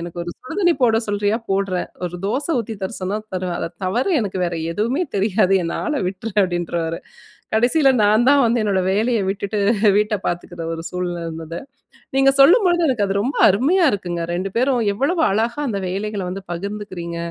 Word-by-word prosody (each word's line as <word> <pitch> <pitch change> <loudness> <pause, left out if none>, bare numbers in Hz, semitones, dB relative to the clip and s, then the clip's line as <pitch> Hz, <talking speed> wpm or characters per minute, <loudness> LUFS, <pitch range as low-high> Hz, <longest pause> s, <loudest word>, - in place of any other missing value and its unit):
"எனக்கு 170 0 -7
ஒரு 175 - -5
சுடுதண்ணி 350 +5 0
போட 225 -2 +4
சொல்றியா 205 +1 +1
போடுறேன். 195 -2 -1 0.2
ஒரு 180 0 -4
தோசை 275 +10 -1
ஊத்தி 225 -1 -4
தர 190 - -3
சொன்னா 190 +3 -2 0.2
தருவேன். 180 -1 -2
அத - - -2 0.2
தவர 210 +8 0
எனக்கு 195 -4 -3
வேற 175 -1 -2 0.2
எதுவுமே 235 - 0
தெரியாது, 195 -1 +2
என்ன 170 - -3
ஆள 305 - -1
விட்ரு!" 200 +4 -6
அப்டின்றுவாரு. 170 -2 -2 0.6
கடைசியில 255 +6 +4
நான்தான் 240 +7 +4
வந்து 235 +1 +2
என்னோட 200 -3 +1
வேலையை 220 +3 +1
விட்டுட்டு 200 +1 -2 0.4
வீட்டை 210 0 +1
பார்த்துக்குற 175 0 -4
ஒரு 165 - -5
சூழ்நிலை 180 -1 -3
இருந்தது. 165 +1 -6 0.6
நீங்க 270 0 +5
சொல்லும்பொழுது 345 - +5
எனக்கு 235 -7 +1
அது 195 - -1
ரொம்ப 260 +8 -2
அருமையா 290 - +3
இருக்குங்க. 175 -4 -3
2 185 +3 -2
பேரும் 255 0 +2
எவ்வளவு 285 - 0
அழகா 225 +6 0
அந்த 205 -5 -2
வேலைகள 200 +2 -3
வந்து 190 +2 -6
பகிர்ந்துக்கிறீங்க. 185 -2 -5
205 Hz, 165 wpm, -20 LUFS, 180-240 Hz, 0.6 s, நீங்க